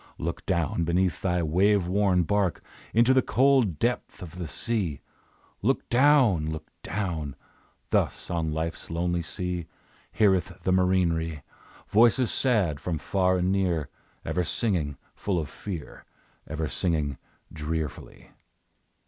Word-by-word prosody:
Look 85 +1 -4
down 85 -3 0
beneath 90 +1 +1
thy 90 -2 +1
wave 95 +4 +3
worn 95 -1 +2
bark 100 0 0 0.3
Into 120 +3 +4
the 130 - +5
cold 130 - +3
depth 120 -3 -2
of 90 +1 -9
the 85 - -4
sea! 95 -6 -2 0.6
Look - - 0
down! 120 - +4
Look 80 0 -6
down! 80 -7 -3 0.6
Thus - - 0
on 80 -2 -1
Life's 80 +1 -4
lonely 85 +1 -1
sea, 90 0 -3 0.4
Heareth 95 -5 +2
the 95 - +1
marinere 85 -5 +1 0.4
Voices 120 +3 +4
sad, 100 - +2
from 85 -3 -2
far 95 +3 +1
and 90 +1 +1
near, 90 -7 0 0.4
Ever 90 - 0
singing 85 - 0 0.2
full 100 -3 -2
of 75 -4 -2
fear, 90 -7 -7 0.4
Ever 80 0 -3
singing 75 -3 0 0.3
drearfully. 80 0 -5
90 Hz, 125 wpm, -27 LUFS, 80-100 Hz, 0.6 s, the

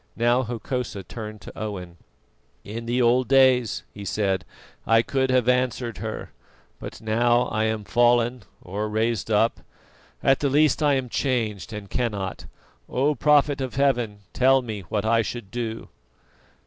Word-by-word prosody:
Now 120 +2 +3
Hokosa 120 -3 -4
turned 110 0 -8
to - - -10
Owen: 90 -5 -6 0.7
"In 115 +3 -7
the 125 +1 +1
old 125 +2 +3
days," 130 -3 +4
he 100 - -8
said, 100 -1 -1 0.4
"I 115 0 +5
could 130 0 0
have 130 -2 +2
answered 125 -2 0
her; 110 -1 -5 0.5
but - - -8
now 120 +2 +2
I 110 0 0
am 110 -1 -1
fallen; 120 +2 +2 0.2
or 105 +4 -3
raised 110 0 -1
up 110 +2 +2 0.6
at 135 0 +4
the 145 - +1
least 150 +1 +3
I 145 -2 +4
am 130 -1 -1
changed 115 -6 -2
and 105 -2 -7
cannot. 105 -5 -3 0.4
O 140 +4 +1
prophet 145 0 +3
of 130 -2 -4
Heaven, 120 -7 +1
tell 130 +1 +4
me 110 -3 -5
what 105 -1 -1
I 115 +1 +3
shall 120 +2 -4
do." 115 -2 -4
120 Hz, 150 wpm, -24 LUFS, 110-130 Hz, 0.7 s, I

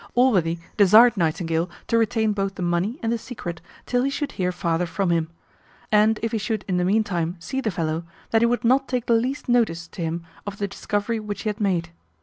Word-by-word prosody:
Allworthy 190 -10 +3 0.2
desired 220 +4 +7
Nightingale 165 -1 0 0.2
to - - 0
retain 220 -1 +2
both 195 -1 -2
the 185 - -4
money 175 - 0
and 225 - 0
the 235 - -2
secret 175 -10 -7 0.2
till 245 0 +1
he 270 - +1
should 280 0 -3
hear 180 -2 -1
farther 170 -1 -1
from 190 +1 -1
him; 165 -1 +1 0.6
and, 215 +1 +4
if 230 - 0
he 225 - 0
should 215 0 -2
in 185 -2 0
the 180 - +1
meantime 185 -4 0
see 265 +10 -4
the 225 - -1
fellow, 165 -3 -2 0.3
that 225 - +4
he 235 - +5
would 240 +1 0
not 260 +3 +3
take 250 -2 -2
the 235 - +2
least 250 +5 0
notice 220 -9 +1
to - - -8
him 165 +1 -3 0.2
of 205 0 -5
the 200 - -1
discovery 205 +3 -2
which 205 -2 -5
he 215 - 0
had 210 +1 -5
made. 175 -4 0
205 Hz, 220 wpm, -24 LUFS, 175-230 Hz, 0.6 s, desired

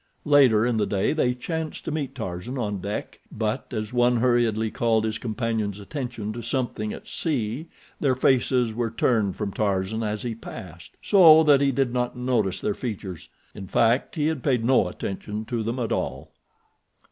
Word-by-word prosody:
Later 135 -7 +5
in 120 -2 +1
the 105 - +1
day 100 +5 +1
they 125 -6 +1
chanced 160 +5 -5
to - - -2
meet 145 -3 -3
Tarzan 110 +2 -5
on 105 -5 -2
deck, 100 +2 -5
but 110 +5 -3
as 110 -1 -4
one 125 0 +3
hurriedly 115 -3 +2
called 115 -3 +1
his 110 -1 -2
companion's 110 -3 -2
attention 115 -1 -5
to 120 - -6
something 115 -3 -2
at - - -9
sea 140 -1 -2 0.3
their 135 -3 +2
faces 125 -2 +2
were 115 0 -1
turned 110 -4 +1
from 105 -2 -3
Tarzan 100 +1 -1
as 105 -1 -2
he 120 -2 -2
passed, 90 -6 -10
so 160 -6 +7
that 145 -3 +5
he 140 -1 +3
did 135 -2 0
not 125 0 -1
notice 120 -7 0
their 105 - 0
features. 100 -8 -6 0.2
In 95 - -8
fact, 115 +6 +2
he 150 -2 0
had 155 -3 0
paid 125 -3 +1
no 125 -7 +4
attention 105 +4 -5
to 115 0 -2
them 115 +3 -2
at 120 -3 -2
all. - - -3
115 Hz, 180 wpm, -25 LUFS, 105-130 Hz, 0.3 s, so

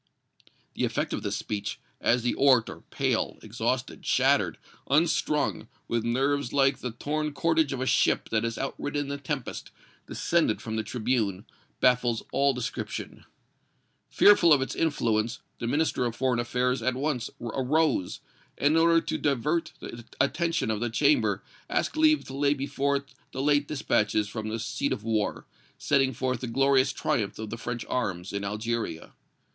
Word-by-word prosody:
The - - -3
effect - - -1
of - - -2
this - - -2
speech, 105 -2 -4 0.2
as 120 0 +2
the 120 - +1
orator, 130 -4 +3
pale, - - 0
exhausted, - - -2
shattered, - - +2 0.3
unstrung, 150 - +1 0.2
with 115 -1 0
nerves 135 +3 0
like 135 -1 +3
the 125 - -3
torn 150 +5 -3
cordage 160 -1 +2
of 135 -2 -3
a - - 0
ship - - +2
that 110 -1 +1
has 115 0 -2
outridden 145 +1 -3
the 140 0 -4
tempest, 140 -2 -4 0.4
descended - - +1
from 110 -1 -5
the 110 - 0
tribune, 110 -3 -1 0.4
baffles 125 -2 +3
all 140 +1 +3
description. 125 -3 -5 0.8
Fearful 190 -5 +6
of 145 - +7
its 130 - -2
influence, 115 -7 0 0.2
the 115 - -3
Minister 145 -1 +1
of 115 - -5
Foreign 125 -2 +1
Affairs 125 +1 0
at 125 +2 0
once 135 -3 -1
arose, 130 - 0 0.4
and 145 +2 +3
in - - +3
order 165 0 +5
to - - -3
divert 150 +4 0
the 120 0 -8 0.2
attention 155 -2 +1
of 105 - -1
the 120 +1 -1
Chamber 200 - +2 0.3
asked - - 0
leave 310 -1 +4
to 135 - -9
lay 140 +1 +2
before 140 0 -1
it 140 0 -5 0.2
the 130 - -3
late 145 0 +3
dispatches 105 -7 +1
from 110 +1 -5
the 110 - -2
seat 110 - -2
of 105 - -6
war, 110 -2 -1 0.3
setting 135 -2 +2
forth 130 0 -2
the 125 - -3
glorious 135 +2 +3
triumphs 105 -5 -1
of 110 -1 -6
the - - -3
French 120 0 -4
arms 95 -7 -2
in 100 0 -2
Algeria. 105 -3 -3
130 Hz, 160 wpm, -27 LUFS, 115-145 Hz, 0.8 s, of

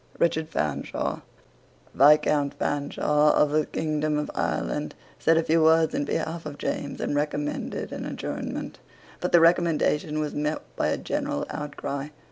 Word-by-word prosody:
Richard 160 -2 +1
Fanshaw, 75 - -2 0.7
Viscount 145 0 +4
Fanshaw 150 +1 +1
of 150 - +3
the 155 0 +1
kingdom 155 -1 -1
of 150 - -2
Ireland, - - -2 0.2
said 165 - +4
a 165 - +3
few 160 +1 +3
words 160 0 +4
in 145 - 0
behalf 160 +2 -3
of 145 -1 -7
James, 145 -1 -3
and - - -1
recommended 145 0 -2
an - - -5
adjournment: - - -5 0.4
but - - -2
the 175 - +7
recommendation 165 -2 +2
was 150 -1 -2
met 150 +1 -2
by - - 0
a - - 0
general 70 - -2
outcry. 145 -1 -4
150 Hz, 145 wpm, -26 LUFS, 145-160 Hz, 0.7 s, the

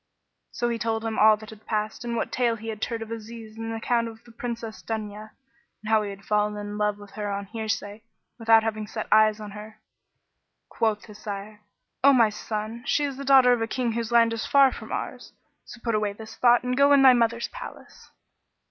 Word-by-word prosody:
So 240 - -1
he 230 -1 -2
told 225 +1 -1
him 225 -1 -2
all 215 0 +7
that 215 +1 -11
had 215 0 -15
passed 215 +1 -2
and 235 -1 -3
what - - -2
tale 240 -2 +1
he 225 0 -7
had 220 -1 -5
heard 230 -1 -2
of 225 - -11
Aziz 225 -1 -8
and 225 0 -5
the - - -3
account 230 +1 0
of 225 0 -11
the 235 - -16
Princess 230 -1 -6
Dunya; 215 -1 -5 0.5
and 215 - -4
how 220 -1 +5
he 205 - -4
had 200 0 -10
fallen 210 0 +1
in 205 0 -6
love 210 -1 0
of 205 -1 -13
her 210 -1 -4
on 200 0 -3
hearsay, 215 -1 -4 0.4
without 225 -1 +5
having 215 -1 -3
set 215 0 -5
eyes 215 0 +5
on 210 -1 -8
her. 210 +1 -10 0.9
Quoth 215 -2 -1
his 210 -2 -13
sire, 205 0 -7 0.4
"O 280 0 +7
my 230 -4 +5
son, 215 +2 -5
she 295 - +2
is 280 -2 -3
the 275 - -6
daughter 265 -2 +6
of 240 - -1
a 225 - 0
King 240 0 -1
whose 230 0 -3
land 230 -1 +5
is 225 - -3
far 275 -2 +6
from - - -9
ours: - - -5 0.3
so - - -11
put 230 - 0
away 210 -1 0
this 220 +1 -11
thought 240 0 +4
and 250 0 -1
go 280 +2 +5
in 280 - +6
to - - +5
thy 260 -1 +9
mother's 235 -1 +1
palace." - - -11
225 Hz, 230 wpm, -25 LUFS, 215-235 Hz, 0.9 s, thy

